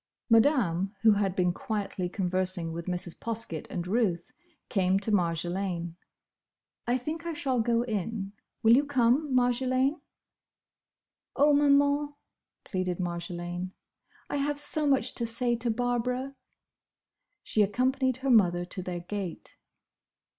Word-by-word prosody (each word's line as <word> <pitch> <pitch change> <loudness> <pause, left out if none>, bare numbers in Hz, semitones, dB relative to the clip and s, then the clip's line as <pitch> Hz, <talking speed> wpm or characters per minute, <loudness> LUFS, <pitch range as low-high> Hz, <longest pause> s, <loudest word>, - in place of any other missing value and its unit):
Madame, 215 - +3
who 220 - +7
had 200 -2 +1
been 180 -2 +2
quietly 195 -3 -3
conversing 185 -3 0
with 170 +1 -6
Mrs. 175 -1 -2
Poskett 225 -9 -3
and 175 -1 -4
Ruth, 185 -4 0 0.4
came 190 -1 +2
to 205 +2 -2
Marjolaine. 175 -1 -1 0.9
"I 245 +1 +2
think 315 +6 -5
I 335 - -2
shall 265 -4 -1
go 235 +1 +2
in. 210 -2 -3 0.3
Will 225 +1 +7
you 280 - +4
come, 275 +1 +2
Marjolaine?" 255 +4 +1 1.3
"Oh, 290 +1 +5
Maman," 285 0 +3 0.5
pleaded 185 -2 -2
Marjolaine, 175 +1 -4 0.5
"I - - -2
have 290 +1 -1
so 295 +1 +1
much 265 -3 +2
to 235 - -1
say 240 +1 0
to 235 +1 -1
Barbara!" 245 +3 -1 1.1
She 215 - +1
accompanied 260 +5 +1
her 270 - +3
mother 175 -6 +4
to 185 +1 -5
their 175 -1 -5
gate. 185 -1 -6
220 Hz, 125 wpm, -28 LUFS, 180-255 Hz, 1.3 s, who